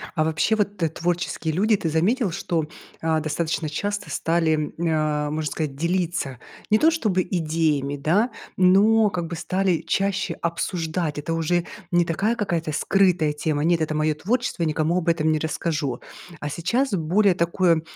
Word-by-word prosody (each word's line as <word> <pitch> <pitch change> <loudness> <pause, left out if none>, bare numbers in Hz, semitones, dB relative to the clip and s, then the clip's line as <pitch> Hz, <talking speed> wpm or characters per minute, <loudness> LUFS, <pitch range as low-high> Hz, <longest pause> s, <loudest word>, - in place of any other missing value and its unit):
А 155 - +2
вообще, 160 +7 +1
вот 205 -1 -1
т 165 -3 0
творческие 170 -1 -2
люди, 215 +5 +3
ты 165 - -2
заметил, 195 - +1
что, 165 -1 -1 0.4
а, 160 -1 +1
достаточно 155 +1 -2
часто 205 +7 -3
стали, 165 -1 +1 0.3
э, 155 -3 0
можно 155 0 -2
сказать, 150 -4 -3
делиться 170 -4 -1 0.3
не 215 - +5
то 320 +1 +5
чтобы 210 - +1
идеями, 155 -5 0
да, 190 - +2 0.3
но 205 +4 +5
как 175 -3 -3
бы 170 - -5
стали 185 0 0
чаще 195 0 0
обсуждать? 165 -2 -2
Это 160 +3 -3
уже 170 +1 0 0.3
не 175 -1 +3
такая 200 +8 0
какая-то 170 -7 -2
скрытая 175 -2 +2
тема: 150 0 -1
"Нет, 170 0 +2
это 155 0 -1
моё 155 0 +1
творчество, 205 +1 -1
я 160 - +1
никому 155 +3 +1
об 180 -2 -2
этом 160 -1 +2
не 155 - +1
расскажу". 150 -4 -2 0.4
А 145 - -4
сейчас 220 - 0
более 190 +3 +3
такое 170 -1 +2
170 Hz, 165 wpm, -23 LUFS, 155-185 Hz, 0.4 s, не